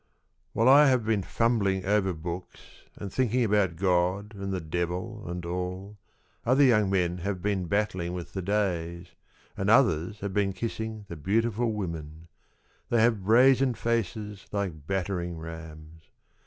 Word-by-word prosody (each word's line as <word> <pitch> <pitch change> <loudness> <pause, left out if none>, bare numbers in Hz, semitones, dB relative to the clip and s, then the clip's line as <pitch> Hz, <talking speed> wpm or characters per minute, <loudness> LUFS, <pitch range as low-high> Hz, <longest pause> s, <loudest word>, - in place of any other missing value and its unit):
WHILE 115 - +2
I 145 +3 +8
have 125 -4 +2
been 110 -2 +1
fumbling 100 -3 0
over 100 -1 +2
books 85 +2 -8
And 100 -2 -7
thinking 125 -1 +1
about 100 -5 +2
God 90 +3 0
and 100 -1 -5
the 95 - -1
Devil 90 +5 -4
and 90 0 -5
all, 90 +3 -4 0.5
Other 130 +4 +4
young 110 -7 +4
men 90 -2 0
have 95 +1 -3
been 100 -3 0
battling 95 -3 -1
with 90 -2 -7
the 95 - -3
days, 90 -3 -2 0.5
And 95 +1 -1
others 105 - +3
have 100 -1 -4
been 100 -1 +1
kissing 110 -1 -5
the 85 - -7
beautiful 115 +7 0
women: 85 -5 -6 0.6
They 120 - +2
have 110 -4 +2
brazen 125 +3 +5
faces 105 -3 -3
like 90 -8 -3
battering 90 -3 -2
rams. 80 -1 -10
95 Hz, 145 wpm, -27 LUFS, 85-110 Hz, 0.6 s, I